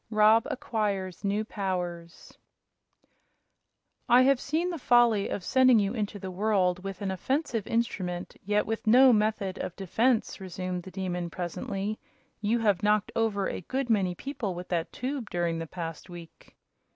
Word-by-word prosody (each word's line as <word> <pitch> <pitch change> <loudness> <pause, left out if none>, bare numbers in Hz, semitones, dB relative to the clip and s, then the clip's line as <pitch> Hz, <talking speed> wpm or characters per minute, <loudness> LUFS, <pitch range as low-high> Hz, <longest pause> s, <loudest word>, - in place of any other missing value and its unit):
Rob 215 +1 +5
Acquires 205 -8 -2
New 205 +2 0
Powers 180 -5 -5 1.7
"I 245 +2 +7
have 270 -1 +3
seen 330 +5 -1
the 335 - -5
folly 240 -5 +4
of 190 - -4
sending 255 +2 +5
you 205 0 +1
into 210 -3 -3
the 190 -1 -6
world 185 -2 +1
with 195 0 -6
an 195 - -1
offensive 240 - -2
instrument, 185 -6 -2
yet 210 +1 +1
with 225 0 -4
no 255 +3 +7
method 210 -3 0
of 175 - -4
defense," 220 +6 0
resumed 185 -1 -4
the 190 - -10
Demon, 180 -2 -3
presently. 195 +5 -4 0.4
"You 215 +3 +1
have 205 -5 +2
knocked 210 0 +2
over 210 -4 +1
a - - -4
good 260 +6 -2
many 190 -5 +1
people 255 -6 -4
with 180 +1 -8
that 170 -2 -1
tube 255 -3 -4
during 170 -1 -1
the 165 - -5
past 165 +1 -7
week." 170 -2 -12
205 Hz, 155 wpm, -28 LUFS, 180-230 Hz, 1.7 s, I